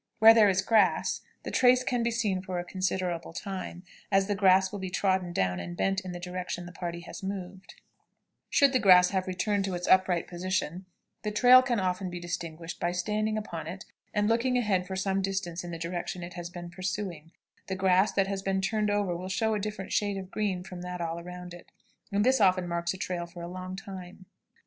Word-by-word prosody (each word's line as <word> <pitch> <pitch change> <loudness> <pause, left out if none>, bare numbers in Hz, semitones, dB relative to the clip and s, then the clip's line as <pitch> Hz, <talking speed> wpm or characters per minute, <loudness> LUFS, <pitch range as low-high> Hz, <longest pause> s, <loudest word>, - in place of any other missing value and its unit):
Where 225 +1 +9
there 215 -3 +6
is 190 0 +2
grass, 210 -3 +3 0.2
the - - -5
trace 255 0 +5
can 245 -1 0
be 235 - +1
seen 215 -5 0
for 185 -1 -4
a 175 - -2
considerable 180 -3 -2
time, 185 -2 -6 0.3
as 195 0 +4
the 205 - 0
grass 190 -1 +4
will 205 - -5
be 190 -1 -4
trodden 185 -1 0
down 90 - 0
and 85 0 -6
bent 195 0 +1
in 185 -2 -7
the 175 - -6
direction 180 0 -5
the 175 - -9
party 170 0 -5
has - - -9
moved; 190 -1 -6 0.7
should 280 -1 +4
the 255 - +4
grass 180 -3 +7
have 190 -1 -1
returned 195 +2 0
to 190 -2 -2
its 175 0 -4
upright 185 -2 +4
position, 185 0 -3 0.3
the 210 - -2
trail 250 +4 +7
can 245 -4 0
often 185 0 -1
be 175 0 -6
distinguished 170 -1 -5
by 175 - 0
standing 215 +4 -1
upon 170 -7 -5
it 185 +3 -7 0.3
and 210 0 +1
looking 240 +3 +2
ahead 195 -6 +1
for 190 - -4
some 195 0 0
distance 190 -3 -3
in 175 - -7
the 165 - -5
direction 175 +1 -4
it 175 - -7
has 175 -1 -6
been 175 -1 -8
pursuing; 185 -3 -4 0.4
the 190 - -2
grass 190 +1 +3
that 195 0 +2
has 195 0 -3
been 195 0 0
turned 210 +2 0
over 205 -4 0
will 185 +2 -5
show 220 +3 +1
a 210 - 0
different 210 -1 -5
shade 205 -1 +1
of 190 0 -7
green 195 -4 -1
from 180 -1 -8
that 180 0 -5
around 175 +1 -5
it, 175 - -13 0.4
and 205 +2 +2
this 260 -2 +4
often 185 -2 +4
marks 170 0 -1
a 190 - -6
trail 175 -2 -3
for 170 0 -10
a - - -5
long 185 +1 -6
time. 185 -1 -9
185 Hz, 215 wpm, -29 LUFS, 175-200 Hz, 0.7 s, Where